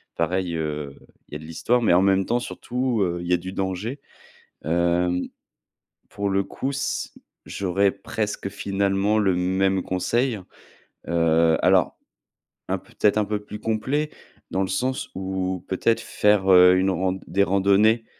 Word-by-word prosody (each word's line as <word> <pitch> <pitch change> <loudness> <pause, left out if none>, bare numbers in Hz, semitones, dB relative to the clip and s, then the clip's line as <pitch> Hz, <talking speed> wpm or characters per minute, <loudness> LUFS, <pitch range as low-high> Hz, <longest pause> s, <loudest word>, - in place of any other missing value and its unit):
pareil, 90 +1 -1
heu, 75 -3 -4 0.4
il - - -15
y - - -4
a - - -14
de 80 - -11
l'histoire, 115 +10 0
mais 110 - +3
en 90 - +5
même 95 0 +3
temps 120 +4 0
surtout, 125 -1 -2
heu, 85 -2 0
il 85 - -6
y 90 - +2
a - - +4
du 95 +2 -7
danger. 95 +8 -3 0.7
Hem 85 +2 +1 0.8
pour 100 0 -3
le 95 0 +2
coup, 135 - -4
s 140 0 -3 0.3
j'aurais 100 +1 +1
presque 105 0 -4
finalement 100 +1 0
le 100 -3 +2
même 95 +1 +1
conseil. 115 +6 0 0.7
Heu, 85 -1 +3
alors - - +3 0.7
un, - - +1
peut-être, 105 0 0
un 105 - +2
peu 105 0 -2
plus 105 0 -8
complet, 120 +8 -1 0.4
dans 95 - 0
le 95 - 0
sens 130 +8 -2
où 95 -1 -3
peut-être 115 +4 +1
faire, 105 -2 +2
heu, 90 0 +7
une 95 +1 +2
rand 95 0 0
des 95 +4 +2
randonnées 100 +4 +3
95 Hz, 160 wpm, -23 LUFS, 90-105 Hz, 0.8 s, heu